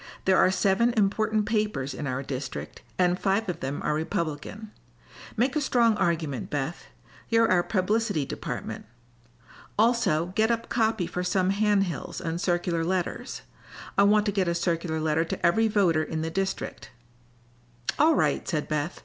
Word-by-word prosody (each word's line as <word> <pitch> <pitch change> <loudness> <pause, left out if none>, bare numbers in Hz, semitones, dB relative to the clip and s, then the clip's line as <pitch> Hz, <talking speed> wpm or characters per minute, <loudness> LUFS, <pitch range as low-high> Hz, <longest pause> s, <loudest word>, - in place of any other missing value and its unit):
There 190 0 +4
are - - +5
seven 200 +5 +2
important 215 +1 +2
papers 210 - -1
in 145 - -5
our 130 +1 -2
district, 135 0 -6 0.2
and 180 0 +2
five 200 +3 +1
of 180 - -3
them 135 +2 -4
are 150 - +1
Republican. 170 +5 -3 0.7
Make 250 +5 +1
a 300 - +1
strong 235 -5 +3
argument, 160 - -1
Beth. 145 +3 -3 0.4
You're 230 -2 +4
our 180 -1 +5
publicity 205 -3 0
department. - - -6 0.9
Also 205 -7 +2
get 220 +1 +3
up 230 0 -1
copy 220 -5 +1
for 180 +2 -3
some 185 +1 +1
hand 205 0 +3
hills 175 -4 -5
and 165 +1 -3
circular 175 -2 0
letters. 180 +1 -3 0.5
I - - +4
want 210 +1 +4
to 205 - +1
get 190 -2 0
a 170 - +1
circular 170 -2 -1
letter 155 +1 +1
to 170 - -3
every 220 +6 +4
voter 190 -7 +2
in 160 0 -3
the 160 - -3
district." 195 +2 -3 1.1
"All 315 +1 +5
right," - - +1
said 155 -4 -1
Beth. 155 +3 -2
185 Hz, 160 wpm, -27 LUFS, 160-215 Hz, 1.1 s, are